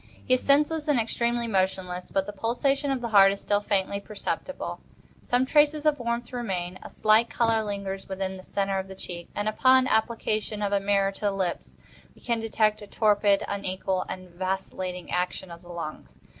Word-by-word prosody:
He 255 - +2
is 255 - +3
senseless 300 +2 +2
and 290 -5 +3
externally 235 +1 0
motionless; 185 -3 -1
but 195 -1 0
the 205 - -6
pulsation 270 +7 0
of 270 -2 0
the 235 - -3
heart 195 -2 +7
is 200 - -4
still 205 0 +1
faintly 200 -1 0
perceptible; 215 - -4 0.4
some 250 +1 +1
traces 300 +2 +3
of 300 -2 +3
warmth 235 +1 -3
remain; 185 -7 -3
a - - -9
slight 215 +2 +3
color 225 -2 +2
lingers 200 -2 -4
within 190 0 -3
the 185 - -10
centre 195 0 -1
of 190 - -5
the 190 - -9
cheek; 175 -2 -8
and, 205 +1 -1
upon 255 +4 +4
application 220 -2 0
of 200 0 0
a 200 - +4
mirror 195 0 +2
to 195 - -12
the 205 - +3
lips, 190 -3 -3 0.4
we - - -20
can 235 -2 -1
detect 215 -1 +1
a 205 - -9
torpid, 205 -2 +3
unequal, 190 -1 -2
and 185 -1 -7
vacillating 185 0 -4
action 180 0 -2
of 170 0 -10
the 175 - -16
lungs. 155 - -7
205 Hz, 190 wpm, -27 LUFS, 190-235 Hz, 0.4 s, heart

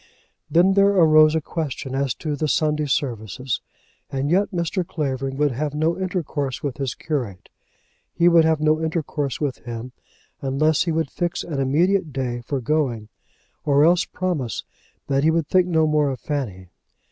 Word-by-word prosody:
Then 180 +3 +4
there 200 0 +5
arose 155 -3 +6
a 160 - +1
question 145 -4 -4
as 135 -2 0
to 150 -2 -3
the 155 +2 -1
Sunday 150 -1 +1
services, 125 -3 -2 0.5
and 135 +2 -1
yet 195 +3 +3
Mr. 180 0 -1
Clavering 135 -5 -3
would 145 -1 +2
have 145 +4 -3
no 160 +3 +1
intercourse 170 -7 -3
with 140 -3 -3
his 135 -5 -3
curate. 125 - -4 0.6
He 170 - +2
would 170 -1 +6
have 160 -1 +2
no 155 +1 +2
intercourse 155 -4 -2
with 145 -4 -2
him 120 +1 -7 0.5
unless 150 +4 +1
he 170 - 0
would 160 -2 -1
fix 175 -1 -2
an 150 -5 -4
immediate 165 +6 +2
day 125 -3 -3
for 140 +3 -2
going, 120 -6 -1 0.5
or 145 0 +4
else 175 +3 +4
promise 155 - -3 0.4
that 140 0 +1
he 160 - +4
would 160 -2 +1
think 185 -1 +3
no 160 -3 +3
more 150 -2 +2
of 130 - -4
Fanny. 100 - -4
150 Hz, 170 wpm, -22 LUFS, 135-165 Hz, 0.6 s, arose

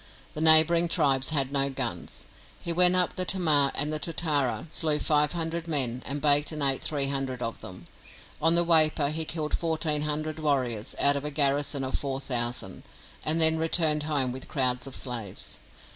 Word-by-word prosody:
The 155 - -6
neighbouring 160 +2 +6
tribes 135 -5 +2
had 140 -4 0
no 140 -1 +1
guns. 135 - -5 0.3
He 170 - -3
went 180 +1 +4
up 180 -1 +1
the 185 - -2
Tamar, 155 -7 +2
and 150 +1 -1
at 155 - -3
Totara 150 -6 -1
slew 155 -3 +1
five 150 0 +1
hundred 165 0 -4
men, 130 -6 -1
and 140 +2 -3
baked 145 +1 +3
and 150 -2 -4
ate 135 -1 +1
three 140 -3 -2
hundred 135 -2 -4
of 115 - -5
them. 90 -1 -11 0.6
On 165 +2 +3
the 170 0 +3
Waipa 155 -3 +3
he 160 +1 -4
killed 155 -1 -3
fourteen 160 -2 -1
hundred 155 +1 -4
warriors 130 -8 -2
out 140 0 +4
of 140 - -4
a 150 - -3
garrison 140 -1 0
of 130 - -4
four 135 -1 -4
thousand, 120 -2 -4 0.4
and 155 +2 0
then 160 0 +2
returned 160 -2 +2
home 145 -4 0
with 130 +1 -8
crowds 125 -2 -1
of 135 - -6
slaves. 115 -7 -3
150 Hz, 185 wpm, -26 LUFS, 135-160 Hz, 0.6 s, neighbouring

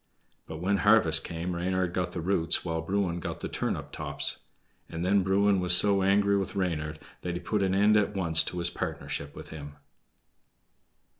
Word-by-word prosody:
But 80 - -7
when 95 +5 0
harvest 100 -7 +4
came 85 +1 -4
Reynard 90 0 -1
got 90 -1 -2
the 90 - -5
roots, 85 -1 +1
while 80 -1 -2
Bruin 90 0 -1
got - - -6
the - - -3
turnip - - -3
tops. - - -2 0.5
And 85 +1 -4
then 100 +1 +3
Bruin 100 +1 +2
was 90 0 +5
so 100 -1 +4
angry 100 +1 +3
with 95 0 -3
Reynard 80 -5 -2 0.2
that 90 -1 -4
he - - -3
put 105 +2 -2
an 95 -1 +1
end 105 +2 +4
at 105 -1 +1
once 85 -4 +4
to 90 - -5
his 85 0 -1
partnership 70 0 -5
with - - -10
him. 75 -2 -9
90 Hz, 180 wpm, -28 LUFS, 85-100 Hz, 0.5 s, was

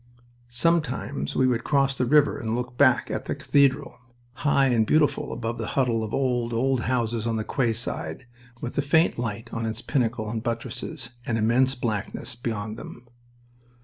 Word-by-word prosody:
Sometimes 125 - 0
we 130 - +3
would 125 -2 +1
cross 135 -2 +2
the 125 -1 0
river 150 +2 +4
and 110 0 -2
look 125 0 -4
back 130 -2 +4
at - - -3
the - - -2
cathedral, 140 -1 +2 0.3
high 140 +1 +2
and 115 -4 +2
beautiful 155 -1 +2
above 115 0 -4
the 110 - -3
huddle 120 -4 +2
of 110 - -5
old, 120 -3 0
old 130 +1 +1
houses 115 -2 0
on 115 - 0
the 110 - -1
quayside, 120 +2 -2 0.3
with 120 - -5
a - - +4
faint 160 0 +2
light 115 -1 -4
on 115 - -2
its 110 +2 -4
pinnacle 115 -5 0
and 110 +1 -3
buttresses 120 +3 -4
and 115 -2 -1
immense 125 +4 +3
blackness 110 -4 -3
beyond 110 -2 -4
them. 120 +1 -11
120 Hz, 170 wpm, -25 LUFS, 115-135 Hz, 0.3 s, river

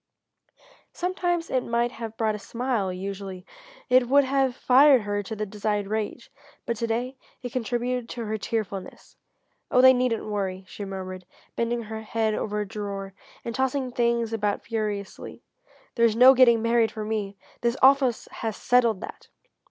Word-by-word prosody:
Sometimes 350 -1 -2
it 255 -1 +1
might 235 +1 0
have 225 -2 -7
brought 220 -1 +1
a 210 - -5
smile, 230 -3 -2
usually 190 0 -6 0.4
it 250 -1 +4
would 285 +1 +6
have 265 -1 +1
fired 265 0 +6
her 205 0 -2
to 205 +2 -6
the 215 0 -3
desired 210 0 -2
rage, 215 +1 -4 0.3
but 235 - -1
to 230 - -2
day 245 +4 -2 0.3
it 245 - -5
contributed 245 0 -2
to 235 -2 -5
her 215 0 -2
tearfulness. 200 -3 -5 0.5
"Oh 250 - +3
they 260 +1 +8
needn't 250 -3 0
worry," 195 -3 -3
she 205 - -7
murmured, 185 -2 -7 0.3
bending 235 0 -1
her 220 0 -6
head 220 0 -1
over 210 0 -2
a 205 - -4
drawer, 195 -1 -5 0.3
and 235 - -3
tossing 265 +1 -1
things 235 -2 0
about 210 -2 -1
furiously, 210 -3 -5 0.5
"there's 230 -2 +3
no 255 +3 +8
getting 235 -3 +5
married 230 -1 +2
for 215 -1 -5
me! 210 -2 -3 0.2
This 235 +2 0
office 265 -3 +4
has 220 -2 -4
settled 235 -5 +2
that!" - - -9
230 Hz, 160 wpm, -25 LUFS, 210-250 Hz, 0.5 s, they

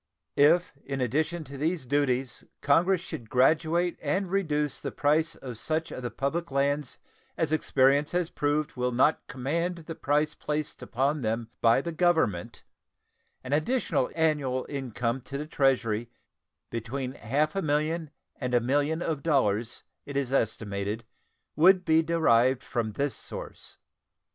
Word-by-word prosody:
If 160 +4 +4
in 135 -1 -4
addition 155 +7 0
to 140 -1 -10
these 160 -1 -1
duties 130 -2 0 0.2
Congress 170 +5 +3
should 155 -11 -8
graduate 160 +6 +2
and 180 +5 -1
reduce 150 -7 0
the - - -4
price 155 +3 +1
of 125 -4 -8
such 160 +4 -1
of - - -6
the 120 - -3
public 140 +8 -2
lands 140 0 0 0.4
as 155 -1 0
experience 140 -1 +3
has 175 -1 -1
proved 145 +1 -1
will 125 0 0
not 130 +6 +2
command 170 +6 -2
the 165 - -5
price 150 0 0
placed 150 0 -3
upon 140 +4 0
them 115 0 -2
by 115 +3 +5
the 170 - -4
Government, 160 - +1 0.8
an 130 +2 -3
additional 155 - +1
annual 150 -6 +1
income 125 -2 -3
to 140 +3 -6
the 150 - -4
Treasury 130 -7 +1
of 120 - -14 0.6
between 125 +3 -3
half 145 - -1
a 195 - 0
million 155 +1 0 0.3
and 125 -2 -1
a - - +6
million 145 +7 0
of 155 -4 -2
dollars, 120 -7 +1 0.2
it 140 -1 -4
is 135 -2 -1
estimated, 105 -2 -1 0.5
would 185 +4 +5
be 160 0 +4
derived 130 -7 +3
from 115 -4 -2
this 140 +4 -1
source. - - -8
145 Hz, 150 wpm, -28 LUFS, 125-160 Hz, 0.8 s, a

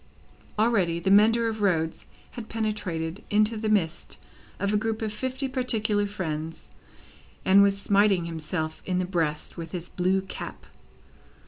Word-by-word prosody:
Already, 200 -7 +2
the 190 +3 0
mender 225 +3 +5
of 220 -1 -3
roads 165 -5 0 0.2
had 235 -2 -8
penetrated 205 -5 -3
into 215 +1 +3
the 215 0 -2
midst 170 -6 0 0.4
of 200 +1 -1
a - - +4
group 220 +1 -1
of 215 -1 -2
fifty 260 +4 -2
particular 220 -6 +1
friends, 165 -5 -5 0.7
and 195 +1 +7
was 200 0 +3
smiting 200 -3 +3
himself 160 -1 -4
in 185 -1 -1
the 185 - 0
breast 165 -5 -2
with 165 -1 -7
his 175 -1 -5
blue 185 +2 +1
cap. 190 - -8
200 Hz, 145 wpm, -26 LUFS, 170-215 Hz, 0.7 s, and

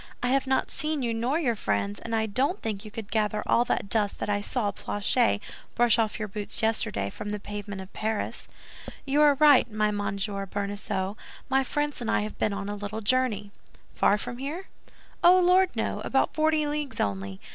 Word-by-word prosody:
I 245 - +2
have 270 +1 +2
not 265 0 +1
seen 305 -1 -2
you 235 -1 0
nor 240 +6 0
your 275 -8 +1
friends, 100 - -1
and 230 0 -3
I 220 0 +1
don't 265 - 0
think 215 -2 -3
you 215 - -8
could 215 -1 -8
gather 210 -1 0
all 235 - +4
that 200 - -1
dust 205 -1 +1
that 205 - -2
I 205 0 +1
saw 210 -1 -1
Planchet 205 +4 +1 0.4
brush 240 -1 +4
off 220 -2 +1
your 215 -2 -3
boots 210 +2 -3
yesterday 100 - 0
from 205 - -6
the 210 0 -3
pavement 205 -1 -6
of 190 - -12
Paris." 220 0 -3 0.6
"You 285 +2 +2
are 295 -1 +6
right, 285 -4 +6
my 210 0 +1
dear 205 0 -2
Monsieur 200 0 -3
Bonacieux, 200 0 -3 0.3
my 270 0 +3
friends 295 +1 -1
and 230 - -2
I - - +2
have 215 +1 -6
been 210 - +1
on 200 0 -4
a 205 - -3
little 205 +2 -5
journey." 215 -3 +1 0.4
"Far 205 - +3
from 240 +3 -6
here?" 310 +8 -5 0.5
"Oh, 360 +2 +8
Lord, 365 +1 +5
no! - - -1
About - - +1
forty 310 -1 +2
leagues 295 -1 -3
only. 95 -1 -2
220 Hz, 200 wpm, -27 LUFS, 205-270 Hz, 0.6 s, Oh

